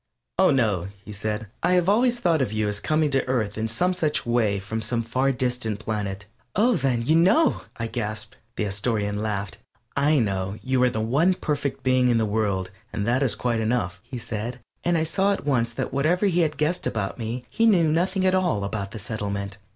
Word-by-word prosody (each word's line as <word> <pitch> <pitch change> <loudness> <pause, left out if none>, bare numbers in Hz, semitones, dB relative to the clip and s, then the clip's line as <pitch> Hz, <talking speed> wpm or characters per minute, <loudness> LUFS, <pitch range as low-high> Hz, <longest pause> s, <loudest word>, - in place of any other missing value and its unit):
"Oh, 190 - +6
no," 105 - +1 0.2
he - - -8
said; 105 +1 -3 0.2
"I 180 - +2
have 180 -1 +3
always 240 +4 +3
thought 165 -7 +2
of 125 - 0
you 110 -1 0
as 105 -1 -1
coming 155 +2 +1
to 135 - +2
Earth 110 -5 0
in 110 +1 -1
some 175 +12 +1
such 155 -5 0
way 115 -4 +2
from 105 +3 -4
some 115 +2 -1
far 130 +4 +1
distant 125 -4 -1
planet." 105 -2 -3 0.3
"Oh, 235 +4 +4
then, 130 -8 0
you 155 +7 +3
know!" 195 - +4 0.2
I 115 - -2
gasped. 110 -1 -4 0.2
The - - -1
Astorian 105 0 -1
laughed. 100 -4 -3 0.4
"I 150 +2 +3
know 100 -4 -1
you 130 -1 +1
are 125 - +5
the 110 -2 -2
one 150 +12 +3
perfect 145 -5 -2
being 130 -1 +3
in 120 -2 +3
the 110 - +2
world, 100 -3 -1 0.2
and 100 - -2
that 120 +4 +2
is 135 -4 +2
quite 120 -2 0
enough," 110 -6 -1
he 120 +3 -8
said, 115 +2 -5 0.2
and 175 0 +2
I 160 - +2
saw 195 +5 +2
at 195 - -5
once 120 -5 +1
that - - -3
whatever 160 +8 +2
he 180 -3 +2
had 155 -3 +1
guessed 165 +4 0
about 105 0 -3
me 120 +2 -4
he 230 0 +2
knew 175 -7 +5
nothing 185 +4 +1
at 185 - +4
all 175 - +1
of 100 -1 -3
the 110 - -8
Settlement. 100 -1 -4
120 Hz, 215 wpm, -25 LUFS, 105-155 Hz, 0.4 s, Oh